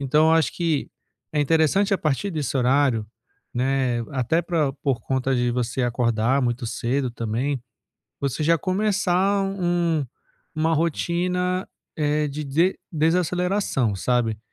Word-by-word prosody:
Então, 150 +3 +3
eu - - +4
acho 160 -7 +3
que 165 -4 -1 0.4
é 150 - +1
interessante 160 +7 +2
a 195 - +2
partir 155 +6 -1
desse 145 -5 -2
horário, 125 -3 +2 0.5
né, 130 -1 0
até 135 +6 +1
pra 160 -5 0
por 135 -3 -1
conta 130 +2 -1
de 120 0 +1
você 125 +1 -1
acordar 120 +2 +1
muito 120 0 -1
cedo 125 +3 -1
também, 120 +3 -2 0.6
você 140 +2 -2
já 165 +2 +4
começar 195 +1 +1
um 175 -6 0 0.5
uma 160 +1 +1
rotina, 180 +3 0 0.3
eh, 150 0 +1
de 150 +2 -5
dese 165 +7 +1
desaceleração, 170 - +1
sabe. 115 0 0
145 Hz, 130 wpm, -23 LUFS, 125-175 Hz, 0.6 s, eu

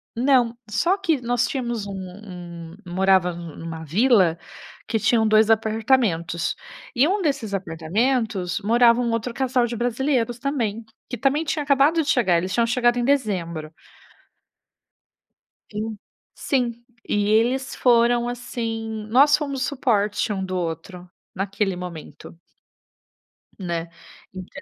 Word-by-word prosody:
Não. 245 -1 +3
Só 345 - +2
que 335 -7 0
nós 245 0 +1
tínhamos 240 -7 -3
um 200 - -6
um 180 -3 -9 0.2
morava 190 -1 +3
um 170 -2 -9
numa 165 -1 -7
vila, 185 - +3 0.5
que 225 - 0
tinham 225 0 +3
2 215 0 +4
apartamentos. 220 -6 +1 0.4
E 260 +5 +4
um 390 +3 0
desses 275 - -1
apartamentos, 190 +3 -1
morava 235 +2 +4
um 240 - 0
outro 230 +1 -2
casal 255 -1 +1
de 240 0 -4
brasileiros 240 0 0
também, 235 -5 -2 0.2
que 245 - -4
também 275 +6 +1
tinha 300 -1 -2
acabado 285 +4 +3
de - - -10
chegar. 190 -9 +3
Eles 185 +3 -2
tinham 235 -1 +2
chegado 240 0 +2
em 240 - 0
dezembro. 180 - -1 2.0
E, 210 - -5 0.6
sim. 250 -4 0 0.4
E 205 0 +1
eles 245 +5 +1
foram, 240 -1 +3
assim 225 -3 -4
nós 280 +6 +6
fomos 280 -3 -3
suporte 220 -7 0
um 195 -2 -2
do 185 0 -4
outro, 175 +1 -5 0.3
naquele 195 0 -1
momento. 170 -3 -9 1.2
Né. 170 -2 -3 0.4
Ent 185 -1 -8
225 Hz, 130 wpm, -23 LUFS, 185-250 Hz, 2.0 s, nós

